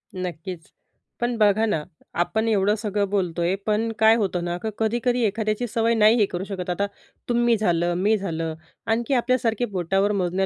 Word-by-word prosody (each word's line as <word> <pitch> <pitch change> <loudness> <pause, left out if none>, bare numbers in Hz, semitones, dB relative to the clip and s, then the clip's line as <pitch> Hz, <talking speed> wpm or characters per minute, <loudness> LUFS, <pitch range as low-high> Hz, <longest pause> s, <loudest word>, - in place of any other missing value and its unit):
नक्कीच. 175 -2 -6 0.5
पण 240 0 0
बघा 215 0 +4
ना, 185 -9 -1 0.3
आपण 220 +6 0
एवढं 205 -1 +2
सगळं 205 -2 -1
बोलतोय, 180 -2 0
पण 220 +1 +1
काय 220 0 +6
होतं 190 -6 -1
ना, 175 0 -2
की 220 - -1
कधी-कधी 240 +2 0
एखाद्याची 215 +3 -1
सवय 230 0 +1
नाही 215 +1 +5
हे 215 - +4
करू 180 -1 -5
शकत. 190 -3 -5
आता 200 +3 0 0.4
तुम्ही 240 -1 +3
झालं, 175 -4 +1
मी 210 +4 +2
झालं 165 -5 -3 0.3
आणखी 230 +4 0
आपल्यासारखे 245 -2 +1
बोटावर 195 0 0
मोजण्या 190 -1 0
210 Hz, 165 wpm, -24 LUFS, 180-225 Hz, 0.5 s, काय